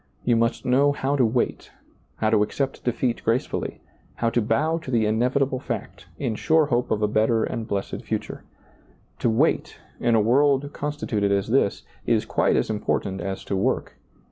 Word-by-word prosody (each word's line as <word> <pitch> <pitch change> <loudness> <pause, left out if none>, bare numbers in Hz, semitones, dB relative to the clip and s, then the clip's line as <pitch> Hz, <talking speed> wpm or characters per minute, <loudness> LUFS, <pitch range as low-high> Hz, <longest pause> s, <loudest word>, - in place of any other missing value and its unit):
You 120 - +3
must 115 +1 0
know 140 +3 +4
how 140 0 -1
to 135 - +3
wait, 120 +1 0 0.5
how 110 0 0
to 110 -2 +4
accept 135 +6 -2
defeat 120 0 -1
gracefully, 115 +3 -1 0.3
how 115 -1 0
to 120 - +2
bow 155 +9 +1
to 160 - -9
the 115 -4 +2
mevitable 130 +3 +1
fact, - - -6
in 115 - -2
sure 160 +7 +3
hope 125 -3 0
of 105 -1 0
a - - +4
better 110 +1 +2
and 115 -1 -3
blessed 100 -1 -3
future. - - -4 0.8
To - - +2
wait, 110 - +1 0.2
in 120 -1 +2
a - - +5
world 140 +5 +2
constituted 135 -9 -1
as 100 +1 0
this, 115 -5 +1 0.2
is - - +2
quite - - +1
as - - +1
important 95 -2 -2
as 95 +1 -4
to 100 - -3
work. 95 - -1
120 Hz, 175 wpm, -24 LUFS, 110-135 Hz, 0.8 s, a